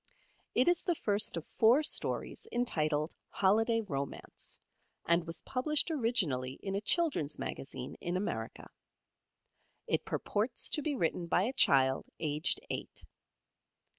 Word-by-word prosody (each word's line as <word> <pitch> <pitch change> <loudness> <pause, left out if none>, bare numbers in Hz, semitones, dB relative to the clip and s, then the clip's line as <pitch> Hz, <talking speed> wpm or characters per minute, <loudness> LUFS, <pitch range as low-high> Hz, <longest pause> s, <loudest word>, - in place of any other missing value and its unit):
It 250 - +4
is 350 -1 +4
the 350 - 0
first 205 - +1
of 165 - -5
four 240 +7 +4
stories - - -1
entitled 155 -10 0 0.2
"Holiday 225 +4 +3
Romance" 140 -9 -5 0.5
and 170 0 +2
was 165 - -6
published 300 +5 +1
originally 180 - 0
in 195 - -3
a 200 - -1
children's 275 - +1
magazine 130 -1 -5
in 175 +1 -1
America. 115 - -4 1.1
It - - 0
purports 220 +4 -1
to 300 - +2
be 295 -1 -1
written 170 -4 -1
by 175 - +3
a 245 +6 -1
child 135 - +4
aged 150 +1 0
eight. - - -5
195 Hz, 130 wpm, -32 LUFS, 155-250 Hz, 1.1 s, It